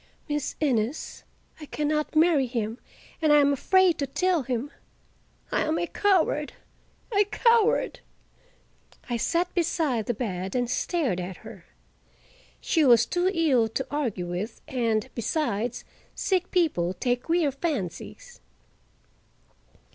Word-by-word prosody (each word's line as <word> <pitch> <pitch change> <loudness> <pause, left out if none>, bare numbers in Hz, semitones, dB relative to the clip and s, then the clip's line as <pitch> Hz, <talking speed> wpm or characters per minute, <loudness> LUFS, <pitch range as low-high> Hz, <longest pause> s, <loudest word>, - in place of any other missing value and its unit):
"Miss 295 -1 -2
Innes, 255 -2 -1 0.4
I 300 - -9
can 300 +1 -2
not 305 +1 -1
marry 310 -4 +4
him, 230 -1 -3 0.4
and 310 -2 +3
I 295 - +7
am 285 -1 +4
afraid 370 +4 +3
to 280 - -1
tell 360 +4 +1
him. 255 +2 -3 0.8
I - - +1
am 315 +1 0
a - - 0
coward—a 390 +3 -1
coward!" 460 +2 +2 1.1
I 240 - +1
sat 345 +8 0
beside 310 - 0
the 240 - 0
bed 190 -4 -4
and 245 -1 +1
stared 285 - 0
at 180 0 -5
her. 215 -6 -11 0.9
She 320 - +1
was 235 -4 +6
too 355 +6 +1
ill 285 - +2
to 265 +4 -3
argue 240 -12 -2
with, 180 +6 -5
and, 230 -3 0
besides, 240 -2 -2 0.3
sick 370 -2 0
people 190 - +1
take 245 +3 0
queer 330 -2 +1
fancies. 290 - -5
285 Hz, 125 wpm, -26 LUFS, 230-335 Hz, 1.1 s, I